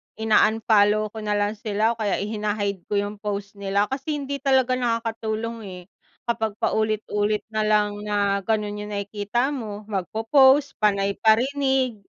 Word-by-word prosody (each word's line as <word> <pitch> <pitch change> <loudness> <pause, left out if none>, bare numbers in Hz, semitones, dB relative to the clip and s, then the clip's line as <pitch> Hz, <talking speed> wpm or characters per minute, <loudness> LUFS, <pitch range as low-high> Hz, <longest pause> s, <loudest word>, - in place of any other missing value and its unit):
in-unfollow 215 -1 +3
ko 220 - -7
nalang 210 0 -1
sila 220 0 +1
o 235 - -5
kaya 205 -3 0
hina-hide 205 -2 -2
ko - - -6
yung 205 +1 -4
post 205 -1 -5
nila. 200 +1 0
Kasi 270 +3 -3
hindi 280 +1 -3
talaga 260 -2 +2
nakakatulong 230 -1 -2
eh 180 -1 -8 0.4
kapag 220 -3 -2
paulit-ulit 215 -1 0
nalang 210 -1 +1
na 200 -1 0
ganun 210 0 -2
yung 210 - -7
nakikita 205 +6 -2
mo 215 -5 -6
magpopost, 265 - +3
panay 200 -1 +2
parinig, 260 0 +2
215 Hz, 135 wpm, -24 LUFS, 205-230 Hz, 0.4 s, in-unfollow